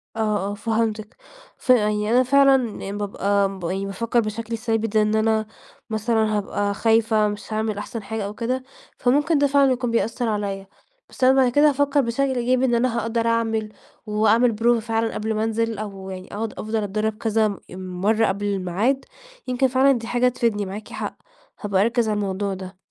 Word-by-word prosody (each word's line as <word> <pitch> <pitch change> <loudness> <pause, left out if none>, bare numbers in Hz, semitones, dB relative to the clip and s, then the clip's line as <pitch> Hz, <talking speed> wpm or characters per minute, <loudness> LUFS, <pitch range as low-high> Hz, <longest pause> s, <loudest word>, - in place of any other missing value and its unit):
آه، 210 -3 0
آه، - - -4
فهمتِك، 220 0 -2 0.4
ف - - -17
يعني 210 -3 +3
أنا 250 +1 +5
فعلًا 255 -6 +2
بابقى 200 -1 0
ب - - -11
يعني 190 +3 -2
بافكر 230 +4 -1
بشكل 230 +1 -3
ثابت 225 -1 -1
زي 215 - +4
إن 210 0 +1
أنا 220 0 +1 0.4
مثلًا 220 -1 +1
هابقى 205 0 -1
خايفة 220 0 +2
مش 210 +1 -6
هاعمل 215 -1 -1
أحسن 210 +1 -6
حاجة 220 0 -4
أو 200 - -5
كده، 255 +4 -2 0.3
فممكن 290 +5 +2
ده 285 - +3
فعلًا 280 -1 +4
يكون 250 -2 -1
بيأثر 230 +1 0
عليَّ، 200 -2 -3 0.4
بس 260 - -7
أنا 260 - +7
بعد 250 -2 +3
كده 290 +4 +5
هافكر 285 0 +2
بشكل 260 +2 0
إيجابي 250 +1 +1
إن 240 -2 +2
أنا 235 0 +1
هاقدر 230 +1 -1
أعمل 225 -2 0 0.4
وأعمل 220 +2 +3
prova 240 0 +4
فعلًا 225 0 -1
قبل 220 +1 -2
ما 215 0 -1
أنزل، 225 0 -1
أو 195 -2 -7
يعني 185 0 -8
أقعد 215 +1 -3
أفضل 215 +1 -5
أتدرب 215 +2 -2
كذا 220 -3 0
مَرّة 190 +4 0
قبل 200 +2 -2
الميعاد، 200 +7 0 0.4
يمكن 255 +1 +2
فعلًا 260 +2 +4
دي 235 -4 -2
حاجة 245 +1 +2
تفيدني، 230 -4 0
معاكِ 200 +3 -7
حق، - - -5 0.4
هابقى 200 -2 +1
أركز 230 +1 +1
على 210 - 0
الموضوع 200 0 -2
ده. 185 0 -8
220 Hz, 180 wpm, -23 LUFS, 205-240 Hz, 0.4 s, أنا